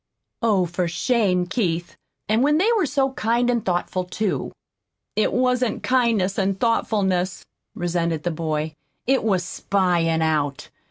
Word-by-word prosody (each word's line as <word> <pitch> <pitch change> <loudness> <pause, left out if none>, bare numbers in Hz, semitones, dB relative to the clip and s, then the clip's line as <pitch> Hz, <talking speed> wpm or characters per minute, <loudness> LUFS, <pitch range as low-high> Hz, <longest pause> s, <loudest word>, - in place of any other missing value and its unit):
"Oh, 205 -6 +3
for 175 +1 -2
shame, 180 0 +1
Keith! 175 -5 -2 0.3
and 220 +3 +2
when 295 +3 +3
they 375 +6 +3
were 390 -8 +2
so 270 -1 +1
kind 240 0 +1
and 235 -3 0
thoughtful, 180 0 -1
too!" 195 +3 -2 0.6
"It 215 - +2
wasn't 250 -2 +1
kindness 230 -7 +2
and 195 0 0
thoughtfulness," 195 -6 0 0.3
resented 170 -3 -1
the 175 - 0
boy. 155 -1 -2 0.3
"It 265 +1 +2
was 190 -5 +1
spying 175 -4 +1
out. 145 -3 -1
190 Hz, 140 wpm, -23 LUFS, 175-235 Hz, 0.6 s, Oh